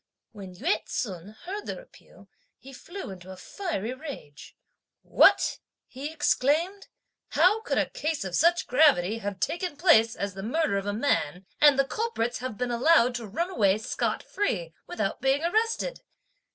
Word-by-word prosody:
When 195 -4 -10
Yü 315 - 0
ts'un 195 -2 -5
heard 405 +3 -6
their - - -4
appeal, - - -18 0.3
he 270 - -14
flew 350 - -8
into 185 -1 -11
a 190 - -10
fiery 255 - -4
rage. 260 - -10 0.5
"What!" - - +4 0.3
he 280 +4 -7
exclaimed. 320 +5 0 0.5
"How 420 +5 +4
could 480 - -2
a - - +2
case 310 -1 -3
of 190 -2 -6
such 340 +2 +3
gravity 245 - +3
have 200 -3 -5
taken 330 - -2
place 230 -10 +4
as 200 -1 -4
the 195 - -7
murder 240 -1 0
of 195 - -7
a - - 0
man, 195 - -1 0.2
and 295 -2 +7
the 275 - +3
culprits 270 - -2
have 250 -4 -5
been 250 0 -2
allowed 250 0 +4
to 240 -2 -5
run 340 - -3
away 200 - +3
scot 220 +3 -2
free, 175 - -2
without 300 - -3
being 270 +3 +1
arrested? 455 +7 0
260 Hz, 165 wpm, -27 LUFS, 205-335 Hz, 0.5 s, and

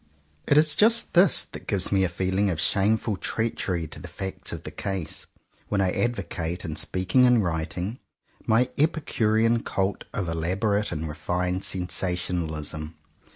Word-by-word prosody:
It 145 - +4
is 155 0 +5
just 230 +5 +3
this 180 +2 +5
that - - -11
gives 100 -4 0
me 95 -1 +3
a 95 - +1
feeling 95 +3 0
of 85 -4 -2
shameful 105 +2 +1
treachery 95 -6 -2
to - - -7
the - - -8
facts 95 0 -6
of - - -6
the - - -7
case, 95 -5 -4 0.4
when 100 - 0
I 95 -2 +2
advocate, 90 -7 -2
in 80 -3 -4
speaking 95 +10 +2
and 120 -3 +4
writing, 85 +7 -3 0.5
my 125 +3 +3
epicurean 115 -7 +2
cult 95 +1 -2
of 100 -5 -3
elaborate 95 +6 0
and 80 -1 -3
refined 90 +5 -2
sensationalism. 90 -4 -2
95 Hz, 150 wpm, -26 LUFS, 85-110 Hz, 0.5 s, is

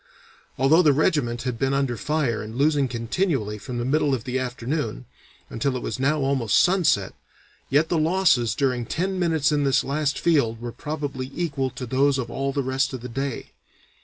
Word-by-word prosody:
Although 140 +6 +5
the 150 -5 +5
regiment 130 -5 +1
had 125 -3 -3
been 135 0 +1
under 135 -3 0
fire 125 +1 -1
and 110 +1 -8
losing 145 0 +2
continually 115 - -1
from 125 +3 -6
the 120 - -2
middle 145 0 +2
of 115 - -6
the 130 0 -2
afternoon, 125 - -3 0.4
until 135 +3 -2
it 125 - -4
was 115 - -4
now 145 +3 +1
almost 135 -6 +1
sunset, 175 - +3 0.6
yet 150 +4 +2
the 170 - +1
losses 160 -8 +2
during 125 -4 0
ten 185 +5 -2
minutes 160 -4 +2
in 145 -1 +1
this 135 -1 +2
last 145 +1 -1
field 140 -10 +1
were 120 0 -5
probably 145 0 -5
equal 140 -6 -1
to 125 +1 -7
those 135 +3 +2
of 120 -3 -4
all 135 0 -2
the 140 0 -1
rest 135 +1 0
of 130 - -5
the 125 - -7
day. 135 +2 -4
135 Hz, 190 wpm, -24 LUFS, 120-150 Hz, 0.6 s, Although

